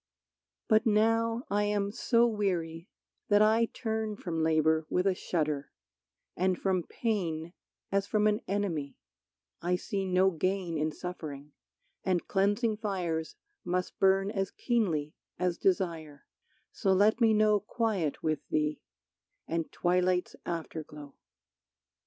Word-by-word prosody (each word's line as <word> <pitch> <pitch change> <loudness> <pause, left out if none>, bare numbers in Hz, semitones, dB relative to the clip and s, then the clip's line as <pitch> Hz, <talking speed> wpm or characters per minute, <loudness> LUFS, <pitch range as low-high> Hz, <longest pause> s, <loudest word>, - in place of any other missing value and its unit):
But 220 +1 +4
now 225 +2 +2
I 205 +1 +2
am 205 -1 0
so 235 +2 +3
weary 180 -6 -1 0.4
that 205 0 +6
I 220 +2 +4
turn 220 -2 -3
From 170 -5 -3
labor 160 0 +2
with 180 - +1
a 195 - +4
shudder, 150 -6 -2 0.6
and 185 0 +1
from 190 -2 +1
pain 170 -6 -2 0.4
As 195 0 +1
from 210 -1 +1
an 210 0 +2
enemy; 170 -9 -2 0.6
I 180 +1 +1
see 195 +2 -3
no 185 +1 +3
gain 185 0 -1
In 155 +1 0
suffering, 150 -4 -7 0.5
and 185 -2 0
cleansing 205 +3 +1
fires 175 -7 -2 0.3
must 180 +1 -2
burn 195 +1 +3
As 195 -3 -1
keenly 170 - 0 0.2
as 180 -1 -1
desire, 165 -6 -1 0.5
so 190 - +1
let 210 +5 +3
me 225 -1 +6
know 215 -1 +4
Quiet 205 - -1
with 155 -2 +1
thee, 150 0 0 0.7
and 165 -1 -2
twilight's 180 0 +1
afterglow. 155 -4 -6
185 Hz, 125 wpm, -30 LUFS, 165-210 Hz, 0.7 s, that